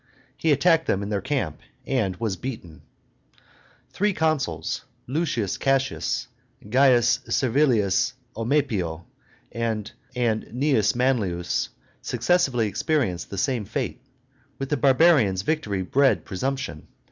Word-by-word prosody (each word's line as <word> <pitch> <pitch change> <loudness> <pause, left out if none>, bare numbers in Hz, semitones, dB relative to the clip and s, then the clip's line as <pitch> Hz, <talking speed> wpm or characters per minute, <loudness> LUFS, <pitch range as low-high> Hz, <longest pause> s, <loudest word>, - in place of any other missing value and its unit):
He 160 - +1
attacked 165 +3 +3
them 95 - +1
in 100 - -4
their 100 -2 -1
camp, 130 - -2 0.3
and 110 -9 0
was 105 0 -2
beaten. 100 -8 -7 1.1
Three 205 +1 +1
consuls, 145 - -1 0.2
L. 160 +7 0 0.3
Cassius, 135 -1 0 0.4
C. 120 +1 +4
Servilius 120 -4 +2 0.2
Omepio, 110 - -1 0.5
and 110 -2 -2 0.2
Cu. 120 +2 +1
Manlius, 105 -9 0 0.3
successively 125 -2 +1
experienced 115 - -1
the 100 - -6
same 125 +2 0
fate. - - -4 0.6
With 135 0 -4
the 145 - +1
barbarians 130 - +4
victory 105 -10 -1
bred 135 +8 +2
presumption. 130 - -4
125 Hz, 105 wpm, -24 LUFS, 100-140 Hz, 1.1 s, C